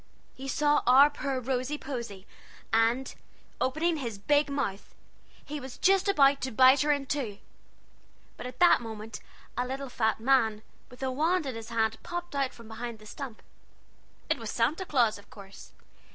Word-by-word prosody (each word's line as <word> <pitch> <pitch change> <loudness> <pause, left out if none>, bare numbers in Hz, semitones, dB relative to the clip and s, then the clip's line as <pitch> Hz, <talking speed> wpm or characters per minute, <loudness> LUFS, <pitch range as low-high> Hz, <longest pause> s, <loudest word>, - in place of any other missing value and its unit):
He 270 +1 -8
saw 295 +1 +2
our 275 +4 +7
poor 275 -2 -3
Rosy 255 +3 -2
Posy, 235 -9 -6 0.5
and, 230 +4 +2 0.5
opening 315 +5 +1
his 235 -7 -4
big 290 +8 +2
mouth, 265 -9 -3 0.5
he 300 0 -5
was 260 -2 -9
just 390 +1 +3
going 275 0 +5
to 265 - -3
bite 260 +3 +6
her 295 0 +2
in 285 -1 0
two; 255 -8 -3 1.0
but - - -7
at 250 - -10
that 355 -7 +6
minute 220 -1 -7 0.4
a 245 +1 -1
little 270 +1 -5
fat 220 -3 0
man, 225 -3 +2 0.3
with 250 +1 -11
a 260 - 0
wand 320 +5 +1
in 265 - -3
his 225 0 -8
hand, 225 -1 0
popped 350 -1 -6
out 275 -2 0
from 230 -2 -14
behind 230 +1 -6
the 215 - -16
stump. 245 0 -8 0.8
It - - 0
was 225 -2 -6
Santa 285 - 0
Claus, 235 -7 +2
of 200 - -19
course. 195 -1 -13
260 Hz, 170 wpm, -29 LUFS, 225-285 Hz, 1.0 s, our